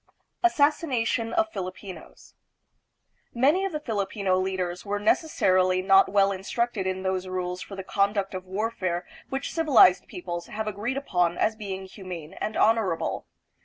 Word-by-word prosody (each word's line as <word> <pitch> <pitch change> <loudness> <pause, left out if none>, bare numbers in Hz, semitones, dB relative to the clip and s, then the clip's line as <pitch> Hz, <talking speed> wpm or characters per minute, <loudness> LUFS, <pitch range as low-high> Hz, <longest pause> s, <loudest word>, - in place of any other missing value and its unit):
Assassination 285 -8 +2
of 330 +3 +1
Filipinos. 185 -2 -8 1.0
Many 295 +11 +3
of 390 - -2
the 305 - -3
Filipino 200 -6 -1
leaders 185 -1 -2
were 205 0 -2
necessarily 185 - +2
not 195 0 +5
well 200 0 +3
instructed 195 +1 -2
in 185 0 -2
those 190 0 -1
rules 180 0 -3
for 200 - -8
the 190 - -6
conduct 200 0 0
of 185 0 -6
warfare 185 -3 -2 0.2
which 270 +1 -3
civilized 265 - +5
peoples 175 -1 -6
have 215 0 -4
agreed 215 +6 -3
upon 180 -10 0
as 220 - +1
being 195 -3 -6
humane 185 -5 -8
and 215 - -4
honorable. 215 -7 +1
195 Hz, 140 wpm, -26 LUFS, 185-225 Hz, 1.0 s, not